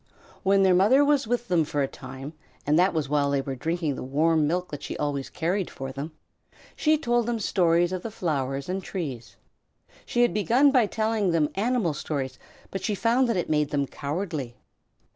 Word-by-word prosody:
When 195 0 +3
their 190 -1 +5
mother 220 +11 +5
was 285 -4 +2
with 240 +1 -1
them 175 -4 +3
for 145 -1 -1
a - - 0
time, 135 +3 -9 0.3
and 150 +3 +3
that 185 +2 +4
was 155 -4 -1
while 145 0 +1
they 140 -1 +1
were 135 0 -4
drinking 160 +3 -2
the - - -6
warm 155 +3 +2
milk 180 +3 -1
that 145 - -6
she - - -5
always 140 -2 -2
carried 180 +3 -1
for 135 0 -6
them, 140 +4 -6 0.6
she 310 0 +3
told 240 -5 +1
them 240 -1 0
stories 175 -4 +2
of 185 -1 -3
the 230 - -5
flowers 140 -9 -2
and 185 +1 -3
trees. 125 - -5 0.7
She 240 - +1
had 240 - +2
begun 240 +7 +4
by 250 -6 +4
telling 220 -2 0
them 160 -3 +2
animal 215 -4 0
stories, 135 -3 -4 0.3
but 195 - -4
she 210 - 0
found 235 +5 +2
that 230 - +1
it 175 - -1
made 150 -2 +1
them 140 -1 0
cowardly. 145 -3 -4
170 Hz, 200 wpm, -26 LUFS, 145-210 Hz, 0.7 s, their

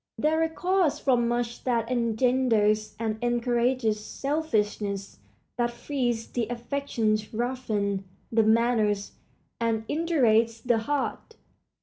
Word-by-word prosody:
They 305 +1 +2
recall 325 +4 +1
us 310 -6 +2
from 245 -3 +2
much 240 0 -2
that 235 -2 0
engenders 230 -3 +2
and 220 -1 -2
encourages 240 -2 +1
selfishness, 210 -9 -2 0.4
that 240 -1 +1
freezes 240 -2 -2
the 235 -3 -1
affections, 235 -3 -1
roughens 220 -5 -1 0.3
the 225 0 +4
manners, 220 -2 +2 0.5
and 225 -1 -1
indurates 235 -9 +2
the 240 -1 +1
heart. 290 - -3
235 Hz, 105 wpm, -27 LUFS, 220-255 Hz, 0.5 s, the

